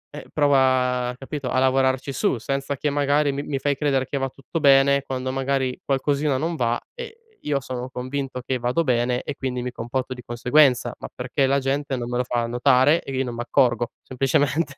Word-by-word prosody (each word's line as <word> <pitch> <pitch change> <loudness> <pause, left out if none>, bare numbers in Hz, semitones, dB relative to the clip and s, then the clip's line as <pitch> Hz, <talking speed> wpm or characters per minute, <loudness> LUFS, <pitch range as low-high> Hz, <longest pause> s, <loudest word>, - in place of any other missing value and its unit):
eh, - - -9
prova, 130 -3 +2
capito, 135 -1 -5
a 130 - +1
lavorarci 130 +1 +1
su 130 - 0
senza 135 +3 -3
che 150 - -1
magari 145 0 +1
mi 140 +1 -3
mi 140 -2 -3
fai 145 +1 0
credere 135 -2 0
che 140 - -3
va 135 0 -1
tutto 140 +5 -6
bene, 140 0 +5
quando 130 -1 -4
magari 135 -1 -1
qualcosina 140 0 0
non 165 +4 -2
va, 120 -3 0
eh 465 -2 -9 0.3
io 145 -2 +1
sono 130 -1 -6
convinto 130 0 -4
che 130 0 -1
vado 125 +7 0
bene 125 -2 +1
e 145 - -5
quindi 125 -2 -3
mi 125 0 -4
comporto 130 +2 -4
di 125 - -11
conseguenza, 125 0 +3
ma - - -8
perché 125 +2 -1
la 140 +1 +2
gente 135 +1 -1
non 120 -1 -4
me 120 - -2
lo 125 - +1
fa 120 -1 -1
notare, 130 +6 +3
e 135 - -6
io 130 - +1
non 120 -1 -5
m' 115 - -7
accorgo 120 -1 +1
semplicemente 140 +3 0
130 Hz, 205 wpm, -23 LUFS, 125-140 Hz, 0.3 s, bene